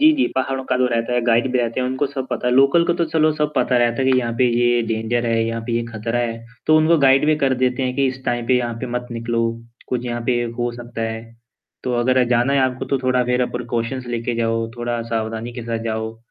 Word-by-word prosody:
जी, 310 +1 +7
जी, 265 - +3
पहाड़ो 130 0 -1
का 130 - 0
तो 130 - +3
रहता 115 +1 -1
है, 120 - +2
गाइड 120 +2 +2
भी 125 - +2
रहते 120 +1 -1
हैं 125 - 0
उनको 130 +2 0
सब 135 -2 -5
पता - - -2
है। 125 - +2
लोकल 140 +6 +5
को - - +3
तो - - +4
चलो 155 -1 +2
सब 150 0 0
पता 125 - +2
रहता 120 +2 +1
है 130 - +2
कि 130 - +4
यहाँ 120 -2 -1
पे 130 - +4
ये 120 0 +3
डेंजर 115 +2 -1
है, 115 -1 +1
यहाँ 115 0 -3
पे 120 - -2
ये 120 - 0
खतरा 115 +2 -2
है। 115 -1 -2 0.3
तो 155 - +5
उनको 155 +2 +4
गाइड 135 +1 +4
भी 155 0 +3
कर 130 -1 +2
देते 125 +1 0
हैं 125 -1 -1
कि 140 - +3
इस 130 0 -6
टाइम 120 -1 -1
पे 130 - +3
यहाँ 120 -1 -2
पे 130 - -3
मत 125 0 -4
निकलो। 115 0 -1 0.5
कुछ 125 -1 -2
यहाँ 120 0 -3
पे 120 -1 +2 0.2
हो 120 0 0
सकता 120 -1 -6
है। 110 0 -6 0.6
तो 125 - -1
अगर 130 +1 +3
जाना 125 +2 +2
है 140 - +3
आपको 130 -1 0
तो 135 - +2
थोड़ा 130 0 +2
ज़रा 125 0 +1
प्रिकॉशंनस 120 +1 -3
लेके 120 0 -2
जाओ, 115 0 0
थोड़ा 120 0 -2
सावधानी 115 +1 -3
के 120 - -7
साथ 115 -1 -3
जाओ। 110 0 -3
120 Hz, 260 wpm, -20 LUFS, 115-130 Hz, 0.6 s, जी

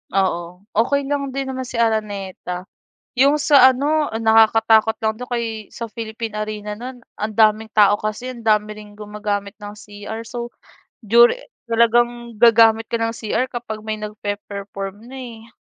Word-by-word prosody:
Oo, 180 -1 -1
okey 270 +6 +1
lang 280 -1 -3
din 270 -1 -2
naman 260 -1 -5
si - - -8
Araneta. 205 -5 -2 0.5
Yung 280 +4 +4
sa 280 -3 +6
ano 295 +4 0
nakakatakot 225 0 +4
lang 220 0 -1
dun 250 +3 -9
kay 225 -3 -4
sa 230 - -6
Philippine 225 -1 -6
Arena 210 0 -4
nun 250 +4 -8 0.2
ang 215 +1 -4
daming 220 0 +3
tao 205 -1 +5
kasi, 215 +5 -4
ang 235 - -11
dami 215 -1 +1
ring 210 -1 -13
gumagamit 205 -1 -4
ng 205 0 -7
cr 205 +2 -8
so 240 +1 -6 0.5
during 235 - +6 0.3
talagang 235 +1 +1
gagamit 225 -1 +5
ka - - -2
ng 230 0 0
cr 225 +3 -1
kapag 235 -3 -5
may 215 0 -4
nagpe-perform 205 -1 -6
na, 265 +2 -10
eh. 230 -2 -10
220 Hz, 155 wpm, -20 LUFS, 210-240 Hz, 0.5 s, sa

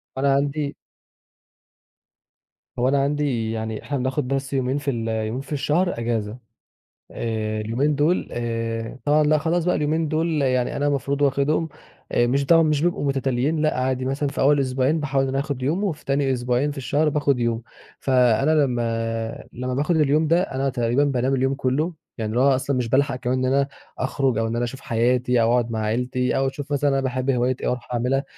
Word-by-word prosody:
فأنا 135 +1 +2
عندي 145 +1 -1 2.0
هو 125 - +2
أنا 140 0 +2
عندي 140 -6 0
يعني 110 -1 -4
إحنا 145 - -2
بناخد 130 +1 -1
بس 135 +1 -2
يومين 130 0 0
في 145 -1 -1
ال 115 -3 -3
يومين 110 +2 -2
في 140 +2 -7
الشهر 150 +1 0
اجازة. 115 -1 -2 0.7
آآ، 110 -1 -2
اليومين 130 +8 0
دول، 150 +6 +1
آآ 115 0 -3
طبعًا 150 +1 +4
لأ 155 +1 +3
خلاص 165 +3 0
بقى 180 - +2
اليومين 155 +2 0
دول 155 0 0
يعني 130 -2 +1
أنا 145 +1 0
المفروض 140 0 -1
واخدهم، 145 +4 +1 0.4
آآ، 120 - +3
مش 140 +3 +1
طبعًا 165 +2 +6
مش 155 -2 +1
بيبقوا 175 -4 0
متتاليين، 135 +3 0
لأ، 155 -3 +1
عادي 130 0 -1
مثلًا 135 +2 -1
في 140 - -4
أول 145 +1 +4
أسبوعين 135 +3 +1
باحاول 135 -2 0
إن 135 - -1
أنا 135 - 0
آخد 140 -2 -3
يوم، 165 +9 0
وفي 175 -7 -3
تاني 135 -1 +1
أسبوعين 125 +3 0
في 145 - -9
الشهر 145 +3 +1
باخد 145 -3 +1
يوم، 115 -1 0 0.4
فأنا 130 +1 +3
لمّا 115 -5 -1
لمّا 125 +1 -3
باخد 150 +6 +1
اليوم 155 +1 +3
ده 170 +3 +3
أنا 135 -7 -1
تقريبًا 120 +1 +1
بانام 135 -1 +1
اليوم 135 +1 +1
كله، 145 +6 0 0.2
يعني 110 -1 -3
اللي 120 - +1
هو 135 0 +5
أصلًا 135 +1 -1
مش 120 -2 -1
بالحق 135 +2 +2
كمان 130 +1 -1
إن 130 - +1
أنا 140 0 +2 0.3
أخرج، 130 -2 0
أو 115 - 0
إن 115 - -2
أنا 120 - 0
أشوف 130 +3 -7
حياتي 125 +1 +1
أو 115 +1 +3
أقعد 120 -1 +1
مع 110 - -2
عيلتي 125 +3 0
أو 135 - +1
أشوف 145 +2 -6
مثلًا 145 0 +2
أنا 135 -1 +1
باحب 130 0 -2
هواية 125 0 +2
إيه - - -2
وأروح 125 0 -3
عاملها، 130 +3 0
135 Hz, 195 wpm, -23 LUFS, 120-145 Hz, 2.0 s, طبعًا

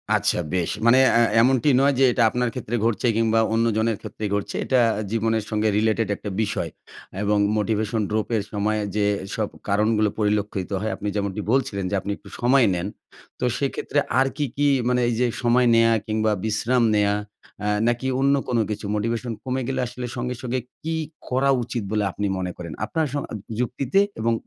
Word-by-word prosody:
আচ্ছা। - - +1
বেশ 90 -3 0 0.2
মানে 125 +3 +6 0.2
আ - - +5 0.2
এমনটি 130 +2 +3
নয় 140 0 +4
যে - - +5
এটা 120 -1 +2
আপনার 125 0 0
ক্ষেত্রে 120 -2 -4
ঘটছে 115 +1 +1
কিংবা 115 0 +3
অন্যজনের 115 -1 +1
ক্ষেত্রে 110 - -8
ঘটছে। 100 -1 -2
এটা 130 -2 +3 0.3
জীবনের 115 -1 0
সঙ্গে 110 0 0
related 110 0 +1
একটা 105 - -6
বিষয় 105 - -2 0.5
এবং 105 0 +2 0.2
motivation 110 +1 0
drop 110 0 -1
এর 100 - -1
সময় 105 +1 0 0.2
যেসব 105 +1 -1 0.2
কারণগুলো 105 +1 +2
পরিলক্ষিত 105 -3 0
হয় 110 - -1
আপনি 105 - -5
যেমনটি 100 0 -2
বলছিলেন 115 -7 0
যে, 100 - -1
আপনি 100 +1 -4
একটু - - -15
সময় 125 +1 +4
নেন। 90 +2 -2 0.5
তো - - 0
সেক্ষেত্রে 140 +1 -1 0.2
আর 135 - +4
কি, 145 - 0
কি 145 0 +3 0.2
মানে 125 0 +2
এই 120 - +1
যে 125 - +3 0.2
সময় 120 +1 +4
নেয়া 115 0 +5 0.2
কিংবা 110 0 +1
বিশ্রাম 115 +3 +1
নেয়া 100 -1 +3 0.5
আ - - 0 0.2
নাকি 120 +2 0
অন্য 140 +1 +4
কোনো 120 -2 +1
কিছু? 105 -1 -4
Motivation 115 +3 -2
কমে 130 0 -2
গেলে 135 - -2
আসলে 125 +1 -6
সঙ্গে, 125 +1 -2
সঙ্গে 130 0 -2 0.2
কি 160 0 -2 0.3
করা 130 +2 +2
উচিত 120 -2 -4
বলে 105 -1 +1
আপনি 105 - -3
মনে 90 -1 -3
করেন? 85 -2 -7
আপনার 160 +7 -1
সম 145 - -1 0.4
যুক্তিতে 130 +7 0 0.2
এবং 115 +1 +1
115 Hz, 180 wpm, -23 LUFS, 105-125 Hz, 0.5 s, মানে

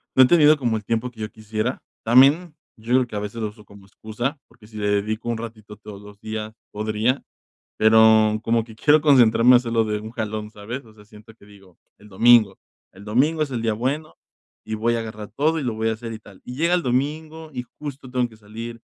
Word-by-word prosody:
no 130 - +8
he - - +7
tenido 155 -1 +5
como 120 -5 -1
el 105 - -8
tiempo 115 +3 -1
que 110 -3 -12
yo 110 - -5
quisiera. 110 +3 -4 0.2
También, 140 +8 +4 0.2
yo 115 +3 -4
creo 130 -1 +3
que 110 - -9
a - - -1
veces 105 +3 -6
lo 110 - -1
uso 105 0 -16
como 100 -1 -16
excusa, 115 +8 -5
porque 105 -3 -20
si 110 -1 -12
le 105 -1 -2
dedico 110 +3 -1
un 115 - -1
ratito 110 -2 -9
todos 105 -2 -11
los 105 0 -14
días, 110 0 -6 0.2
podría. 110 +5 -1 0.5
Pero 110 0 +5
como 115 0 +1
que 110 -1 -14
quiero 150 +6 +4
concentrarme 125 -4 +5
a - - +9
hacerlo 115 -2 0
de 105 -1 -2
un 110 +1 -9
jalón, 110 -2 -5
¿sabes? 115 +5 -7
O 110 - -18
sea, 105 - -18
siento 105 +1 -16
que 110 - -21
digo, 100 -3 -19 0.2
el 105 - -17
domingo, 110 0 +5 0.4
el 95 - -14
domingo 140 +9 +1
es 150 -3 -1
el 120 -3 -3
día 115 -1 0
bueno 130 - -3 0.5
y 110 - -4
voy 115 +2 0
a 115 - -1
agarrar 110 -2 -7
todo 155 +5 +1
y - - -4
lo 120 -3 -2
voy 110 +1 -1
a 110 - 0
hacer 115 +1 -7
y 110 - -8
tal. 100 -3 -17
Y 125 - -7
llega 170 +5 +2
el 175 - -1
domingo 155 +5 -2
y 125 -1 -4 0.2
justo 140 -3 -8
tengo 125 -1 0
que 110 - -17
salir 115 +2 -9
115 Hz, 235 wpm, -22 LUFS, 110-125 Hz, 0.5 s, a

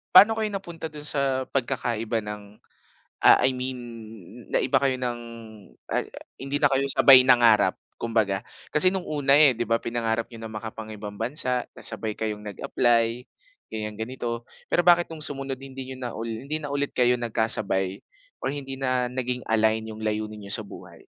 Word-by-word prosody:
paano 220 +4 +8
kayo 215 - +1
napunta 175 -5 -6
dun 150 -1 -10
sa 135 -3 0
pagkakaiba 115 -3 -1
ng, 105 0 -6 0.8
ah, - - +8
I 130 - +3
mean 130 0 -4 0.7
naiba 130 - +2
kayo 130 -2 +2
ng 120 -2 -3 0.7
uh - - 0 0.4
hindi 135 +1 -1
na 145 -1 +4
kayo 135 0 +1
sabay 135 -1 +8
nangarap 115 -6 +5 0.2
kumbaga. 110 -4 +1 0.3
Kasi 185 +5 +5
nung 185 -2 -3
una, 140 -2 +1
eh, 145 -4 +7
'di 120 - -1
ba 115 - +4
pinangarap 115 -1 -1
niyo 115 -2 -11
ng 110 - -8
makapangibang 110 -1 -7
bansa, 125 0 0
tas - - -8
sabay 110 0 -3
kayong 105 -1 -4
nag-apply, 115 +3 +1 0.5
ganiyan, 105 -1 -4
ganito. 120 0 -4 0.2
Pero 175 - +3
bakit 175 -1 +6
nung 160 -1 -8
sumunod 135 -3 -3
hindi 135 -1 -8
niyo - - -10
na 120 - -3
hindi 115 +7 -3
na 145 - -5
ulit 145 0 0
kayo 125 0 +4
nagkasabay 110 -4 0 0.4
,or - - -1
hindi 135 -2 -5
na 130 -2 0
naging 125 0 -2
align 110 0 +2
yung 110 0 -8
layunin 105 0 -3
n'yo 100 - -3
sa - - -2
buhay? - - -12
125 Hz, 170 wpm, -25 LUFS, 110-135 Hz, 0.8 s, paano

